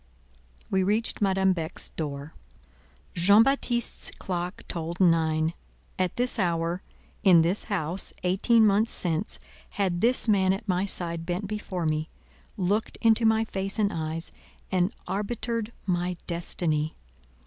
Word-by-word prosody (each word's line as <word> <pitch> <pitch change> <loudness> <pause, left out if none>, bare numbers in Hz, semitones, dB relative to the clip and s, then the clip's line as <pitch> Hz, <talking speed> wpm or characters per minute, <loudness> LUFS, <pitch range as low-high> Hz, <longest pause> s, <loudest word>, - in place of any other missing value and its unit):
We 190 - +3
reached 210 +5 0
Madame 190 -1 +3
Beck's 165 -3 -6
door. 145 -1 -5 0.8
Jean 200 +6 +6
Baptiste's 245 -3 0
clock 180 0 -4
tolled 170 0 -4
nine. 160 -2 +3 0.5
At 185 -2 0
this 245 -1 +1
hour, 170 -1 0 0.4
in 180 -5 +6
this 180 +5 +1
house, 185 -3 -1
eighteen 220 +5 +4
months 210 +2 +3
since, 170 +2 -1 0.4
had 185 -3 0
this 245 +1 +3
man 190 -3 +4
at 210 +3 -6
my 185 0 +1
side 170 -4 -3
bent 180 +4 -2
before 195 -4 -4
me, 155 0 -1 0.5
looked 205 +3 0
into 225 0 +5
my 220 0 +3
face 195 0 -3
and 210 -1 +1
eyes, 160 +1 -4 0.4
and 185 +1 +2 0.2
arbitered 220 +3 -2
my 180 -1 -1
destiny. 160 -3 -1
185 Hz, 130 wpm, -27 LUFS, 170-210 Hz, 0.8 s, Jean